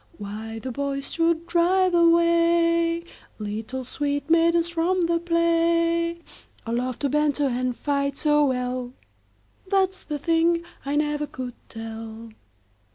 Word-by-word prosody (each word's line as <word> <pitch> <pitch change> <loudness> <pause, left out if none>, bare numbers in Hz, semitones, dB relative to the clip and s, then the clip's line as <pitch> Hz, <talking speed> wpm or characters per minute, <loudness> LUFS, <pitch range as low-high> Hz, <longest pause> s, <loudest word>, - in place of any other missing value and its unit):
Why 215 +2 -6
the 255 +3 -5
boys 275 +1 -3
should 335 0 +1
drive 355 +2 +2
away 335 0 +3 0.3
Little 220 +5 -5
sweet 285 +3 -2
maidens 335 0 +4
from 345 +2 +1
the 335 0 +1
play, 335 0 +1 0.4
Or 230 - -3
love 250 +1 -1
to 280 - +1
banter 295 0 +1
and 255 -1 -1
fight 280 -1 -1
so 295 -1 +3
well, 250 -1 -2 0.7
That 380 -1 +2
's 375 - -13
the 300 - -4
thing 335 +3 +2 0.2
I 285 - 0
never 295 0 0
could 255 -3 -6 0.2
tell. 225 0 -8
300 Hz, 130 wpm, -24 LUFS, 255-335 Hz, 0.7 s, maidens